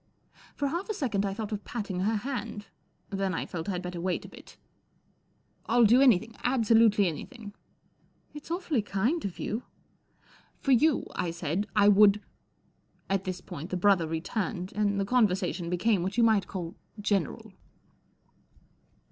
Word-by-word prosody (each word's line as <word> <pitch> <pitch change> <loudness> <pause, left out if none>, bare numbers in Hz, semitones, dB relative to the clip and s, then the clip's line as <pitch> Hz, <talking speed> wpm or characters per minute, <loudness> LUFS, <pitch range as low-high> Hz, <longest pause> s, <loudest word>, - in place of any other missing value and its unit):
For 285 -1 -1
half 345 +8 -4
a 430 - -1
second 220 - -1
I 195 - -3
thought 215 -1 -5
of 205 -1 -4
patting 200 -6 -4
her 210 +4 +1
hand, 220 -3 -4 0.5
then 195 -2 -1
I - - -2
felt 165 +1 -5
I'd 180 -1 -2
better 180 -1 -5
wait 185 0 -2
a - - -10
bit. - - -15 0.5
' - - -42
I'll 240 -1 +5
do 240 +5 +6
anything, 230 -4 +4
absolutely 225 -4 +4
anything." 205 - -7 0.4
" - - -39
It's 295 +1 -10
awfully 335 - 0
kind 215 - -1
of 190 - -5
you." 220 +3 -3 0.5
" - - -31
For 275 - +1
you," 290 +4 +4
I 175 - -1
said, 170 +4 -2
" - - -31
I 205 -1 +5
would 205 0 +6 0.5
" - - -39
At 195 -1 0
this 185 -1 -4
point 155 +5 -8
the 185 - -2
brother 180 -3 +3
returned, 180 +3 -3
and 205 -1 0
the 195 - 0
conversation 190 -6 +1
became 185 +2 +1
what 190 +5 -3
you 235 - +5
might 215 -5 +3
call 175 -3 -5 0.3
general. 200 -6 -1
205 Hz, 170 wpm, -28 LUFS, 185-230 Hz, 0.5 s, do